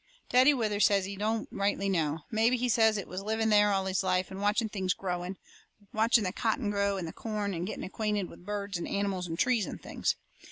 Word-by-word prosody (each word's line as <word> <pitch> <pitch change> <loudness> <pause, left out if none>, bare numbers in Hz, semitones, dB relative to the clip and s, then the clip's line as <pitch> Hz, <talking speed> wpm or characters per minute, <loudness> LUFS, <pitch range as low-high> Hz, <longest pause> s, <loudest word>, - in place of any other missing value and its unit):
Daddy 255 +3 +7
Withers 215 -6 +2
says 200 -2 +2
he 200 +1 -5
don't 215 +2 -1
rightly 200 0 0
know. 160 -4 0
Mebby, 230 +3 +3
he 250 +1 0
says, 220 -2 +4
it 200 - -5
was 185 +2 -5
living 220 +2 0
there 210 -1 +5
all 195 -1 +1
his 190 +1 0
life 185 -1 0
and 190 +1 -6
watching 210 +2 +2
things 190 -3 -1
growing 180 0 -4 0.6
watching 225 +1 +4
the 185 -1 -2
cotton 225 0 0
grow, 200 -1 +1
and 180 -3 -4
the 160 - -7
corn 210 -3 -3
and 175 +1 -3
getting - - -5
acquainted 210 -1 -2
with - - -14
birds 200 -1 -3
and - - -4
animals 195 -3 -1
and 165 0 -4
trees 235 -4 +2
and - - -6
things. - - -1
200 Hz, 220 wpm, -30 LUFS, 190-220 Hz, 0.6 s, Daddy